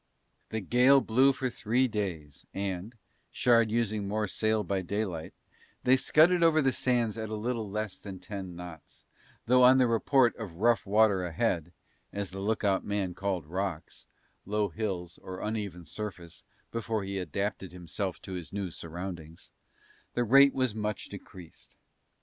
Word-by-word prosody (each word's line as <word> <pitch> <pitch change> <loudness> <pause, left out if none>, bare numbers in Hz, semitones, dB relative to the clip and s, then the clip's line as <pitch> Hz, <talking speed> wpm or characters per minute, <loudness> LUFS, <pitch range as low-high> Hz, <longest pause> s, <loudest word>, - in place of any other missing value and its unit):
The 110 - -3
gale 125 +7 +5
blew 130 +3 +4
for 130 -1 -2
three 125 +2 +1
days 90 - -5
and, 100 +3 -3 0.3
Shard 115 -2 +3
using 110 -3 0
more 105 +1 -1
sail 110 +2 +1
by 100 -2 -1
daylight, 95 -4 -3 0.5
they 130 - +6
scudded 165 +6 +4
over 165 -2 +5
the 135 -3 +3
sands 120 -4 0
at 110 -1 -4
little 110 0 -3
less 105 -1 -3
than 95 -2 -8
ten 95 -1 -7
knots, 85 -2 -11 0.4
though 125 +1 +5
on 125 +1 +8
the 130 - +5
report 120 +2 +3
of 105 -8 -7
rough 115 +3 +2
water 100 -2 +4
ahead 90 -2 -1 0.4
(as 100 -2 -4
the 95 - -6
lookout 100 -2 +1
man 100 -3 -2
called 95 -3 -2
rocks, 90 0 -4 0.4
low 105 +1 0
hills 90 -3 -4
or 95 0 -7
uneven 100 -5 -4
surface 90 -1 -7 0.3
before 115 -2 -2
he 95 0 -3
adapted 100 0 -3
himself 90 +2 -4
to 95 - -7
his 90 -3 -6
new 100 -3 -3
surroundings) 85 -1 -8 0.6
the 120 - +2
rate 135 +4 +6
was 130 -4 +1
much 105 -2 -3
decreased. 90 -3 -12
105 Hz, 150 wpm, -29 LUFS, 95-115 Hz, 0.6 s, on